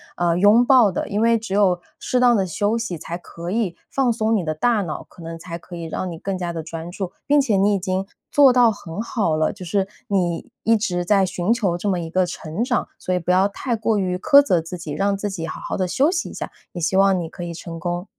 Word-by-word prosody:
呃， 170 -1 +1
去 - - -1
拥 210 +5 +6
抱 245 -5 +5
的， 180 - -3
因 205 +1 -1
为 230 0 +4
只 215 -3 -4
有 185 -4 +3 0.2
适 250 - 0
当 245 -2 +5
地 195 - +1
休 205 +5 0
息 225 -8 -4
才 170 +2 -5
可 170 -1 -8
以 195 -4 -1
放 260 -3 +1
松 220 0 +1
你 200 - 0
的 155 -1 -1
大 215 +6 +1
脑， 160 -4 -5
可 170 - -14
能 165 0 -7
才 170 0 -6
可 175 +1 -11
以 170 -1 -6
让 180 +3 -4
你 165 - -8
更 195 +1 -3
加 175 -1 -3
的 165 - -4
专 165 +1 -7
注。 185 -1 -4
并 290 0 +4
且 225 -7 +1
你 200 +2 +3
已 200 - +1
经 190 +1 -2 0.3
做 280 -3 +6
到 245 -2 +5
很 200 -2 -6
好 215 -8 0
了， 155 0 +1
就 190 -2 -10
是 195 +2 0 0.2
你 185 +4 -1
一 225 0 +3
直 180 -4 -1
在 195 +1 +3
寻 180 +2 -1
求 210 -7 +1
这 180 +4 -2
么 185 -2 0
一 165 -1 -6
个 185 0 +2
成 165 +4 -4
长。 245 -1 0
所 185 - -1
以 - - +2
不 180 0 -1
要 185 +2 +4
太 235 +4 -3
过 220 0 0
于 180 -2 -1
苛 280 +8 +7
责 180 -11 +2
自 165 +3 -7
己， 160 -3 -7
让 200 +6 0
自 205 +1 -3
己 165 -4 -4
好 - - -6
好 - - -4
的 185 -1 0
休 280 - +2
息 360 -1 -2
一 - - -10
下， - - -5 0.2
也 175 - -5
希 175 +3 0
望 195 -1 +4
你 170 - -4
可 175 - -8
以 170 - -4
成 165 0 -7
功。 175 +1 -3
190 Hz, 290 characters per minute, -22 LUFS, 175-220 Hz, 0.3 s, 苛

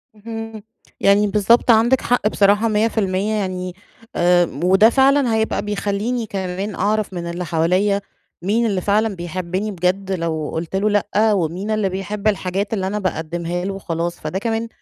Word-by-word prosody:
اهم، 225 0 -7 0.4
يعني 200 +1 +4
بالضبط 215 +4 +4
عندِك 235 +4 +4
حق 245 -3 +1
بصراحة 205 +1 +3
100% 210 -2 0
يعني 185 -3 -3 0.4
آآ، 175 0 +4 0.2
وده 190 +5 +6
فعلًا 270 -1 +3
هيبقى 220 0 0
بيخليني 205 +3 -2
كمان 195 0 -4
أعرف 215 -1 0
من 170 -1 -4
اللي 175 +1 -4
حواليّا 180 +5 +1 0.4
مين 215 +6 +1
اللي 200 -4 0
فعلًا 210 +2 +1
بيحبني 185 +4 -3
بجد 185 +1 -1
لو 165 -4 -2
قُلت 165 +3 -4
له 200 +2 +2
لأ، 210 +1 +2
ومين 185 +3 -2
اللي 215 -2 +1
بيحب 195 +3 -4
الحاجات 200 0 -1
اللي 190 -3 -1
أنا 210 +2 -2
باقدّمها 175 -1 -3
له 195 - -2
وخلاص، 170 -2 -4
فده 155 +5 -3
كمان 225 +1 -2
200 Hz, 155 wpm, -20 LUFS, 180-215 Hz, 0.4 s, وده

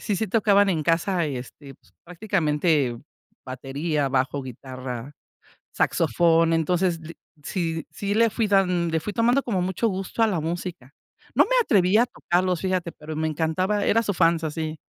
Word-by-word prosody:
sí 205 - -1
sí 220 - -1
tocaban 205 -1 +3
en 165 -5 0
casa, 170 +2 +1
este, 135 +1 -8
pues, - - -29
prácticamente, 160 - 0 0.5
batería, 140 +3 -2
bajo, 135 +1 0
guitarra, 130 0 -7 0.6
saxofón, 165 -1 +2
entonces, 175 +1 +1
l 160 +1 -9 0.3
sí 165 -1 -3
sí 200 0 -3
le 230 +1 +4
fui 220 0 -1
dand 180 -4 +2
le 160 - +1
fui 210 - -4
tomando 240 +5 +2
como 195 -7 -1
mucho 190 +5 0
gusto 195 +3 -1
a - - +4
la 190 -6 -1
música. 165 -4 -5 0.4
No - - +5
me - - -10
atreví 200 - +3
a 235 - +5
tocarlos, 180 -5 -1
fíjate, 185 -3 -1
pero 155 0 -8
me 160 +1 -1
encantaba 165 +7 0
era 230 +3 +2
su 205 - -1
fans, 165 -2 +2
así. 155 0 -3
170 Hz, 165 wpm, -24 LUFS, 155-195 Hz, 0.6 s, No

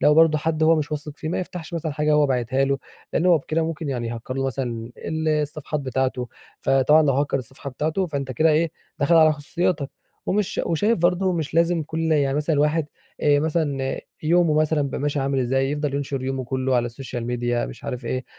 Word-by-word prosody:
لو 150 - +5
برضه 160 -1 +5
حد 155 +1 -1
هو 160 +1 +5
مش 155 0 -2
واثق 150 0 -4
فيه 155 - -5
ما 165 - -1
يفتحش 175 -2 -7
مثلًا 160 -2 -2
حاجة 150 +1 +1
هو 150 -1 +4
باعتها 130 0 +1
له، 135 0 0 0.3
لأنه 180 - +2
هو 170 -2 +6
بكده 160 +3 -1
ممكن 160 -1 -3
يعني 120 -4 -2
يهكر 115 +2 -5
له 135 0 -1
مثلًا 120 -3 -3
ال 160 0 -2
الصفحات 150 0 -1
بتاعته. 130 -1 -1 0.3
فطبعًا 135 +4 +4
لو 140 -3 +3
هكر 140 +1 +1
الصفحة 130 +2 -8
بتاعته 155 +8 -1
فأنت 140 -4 -3
كده 160 +6 +3
إيه 155 +1 +2 0.3
دخل 145 +4 +3
على 155 -1 +7
خصوصياتك، 150 0 -1 0.4
ومش 205 0 +1
شا - - -2
وشايف 205 +6 +2
برضه 180 +2 +2
مش 160 -3 -3
لازم 170 -1 +3
كل 160 +1 -1
يعني 140 -2 +2
مثلًا 150 +1 +1
الواحد 150 +1 +2 0.3
آآ، 145 -1 +4
مثلًا 145 -4 -1 0.2
يومه 165 0 +3
مثلًا 155 0 +2
يبقى 140 - -2
ماشي 145 0 0
عامل 135 0 0
إزاي 135 +2 +1
يفضل 145 -1 -2
ينشر 140 -2 -2
يومه 130 -1 -2
كله 130 0 0
على 120 0 +1
السوشيال 120 0 -6
ميديا 120 0 -1
مش - - -10
عارف 125 -1 -4
إيه، 130 +2 -2
145 Hz, 210 wpm, -23 LUFS, 135-160 Hz, 0.4 s, على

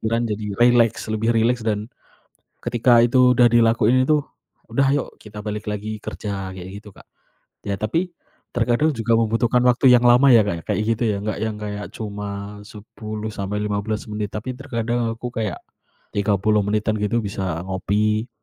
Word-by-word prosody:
Pikiran 115 +1 0
jadi 105 -1 -4
rileks, 120 -2 +4
lebih 110 +1 0
rileks, 115 +1 +2
dan 105 -1 -1 0.7
ketika 120 0 +3
itu 125 +2 +5
udah 120 0 +6
dilakuin 115 +1 +3
itu, 150 +3 +3 0.5
"Udah 135 +4 +2
ayok 140 -1 -2
kita 105 0 -11
balik 105 0 -5
lagi 105 +1 -4
kerja," 100 -3 -5
kayak 90 -1 -8
gitu, 105 - -13
Kak. - - -18 0.6
Ya 100 -1 -3
tapi 165 - -1 0.4
terkadang 120 +6 +1
juga 115 -2 0
membutuhkan 115 +2 +2
waktu 125 +1 +4
yang 120 0 +4
lama 125 +3 +6
ya, 115 - +7
Kak, 100 - -1
ya, - - -28
kayak - - 0
gitu 115 - -4
ya. 105 - 0
Nggak 110 0 -3
yang 110 -1 -2
kayak 105 0 -5
cuma 105 -1 -6
10-15 105 0 -4
menit, 105 -1 -3
tapi 115 +4 -4
terkadang 115 -2 -2
aku 120 +2 -6
kayak 110 - -2 0.6
30 105 +1 +2
menitan 110 +1 0
gitu 105 +3 0
bisa 95 -5 -3
ngopi. 105 +4 0
110 Hz, 160 wpm, -22 LUFS, 105-120 Hz, 0.7 s, ya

